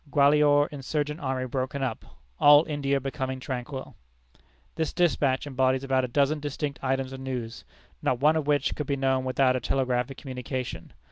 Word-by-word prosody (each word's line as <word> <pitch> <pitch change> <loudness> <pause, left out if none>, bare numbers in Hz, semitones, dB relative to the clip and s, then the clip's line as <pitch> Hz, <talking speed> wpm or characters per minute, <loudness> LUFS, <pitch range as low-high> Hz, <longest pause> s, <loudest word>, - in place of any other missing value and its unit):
Gwalior 145 0 +5
insurgent 150 +2 -3
army 130 -4 -2
broken 130 +2 -3
up. 125 -4 -3 0.4
All 145 +2 +7
India 140 -2 0
becoming 130 -1 -4
tranquil." 130 +1 -6 0.8
This 160 - -2
despatch 145 -7 +1
embodies 130 -1 +1
about 135 -1 +1
a - - -1
dozen 140 +4 +1
distinct 145 -1 -4
items 135 0 -1
of 135 - -7
news, 125 -3 -5 0.4
not 125 - 0
one 150 +4 +4
of 155 -2 -1
which 145 -1 +2
could 150 - -4
be 140 - 0
known 130 -1 +1
without 130 0 +2
a - - 0
telegraphic 130 +1 -1
communication. 130 - -6
135 Hz, 160 wpm, -27 LUFS, 130-145 Hz, 0.8 s, All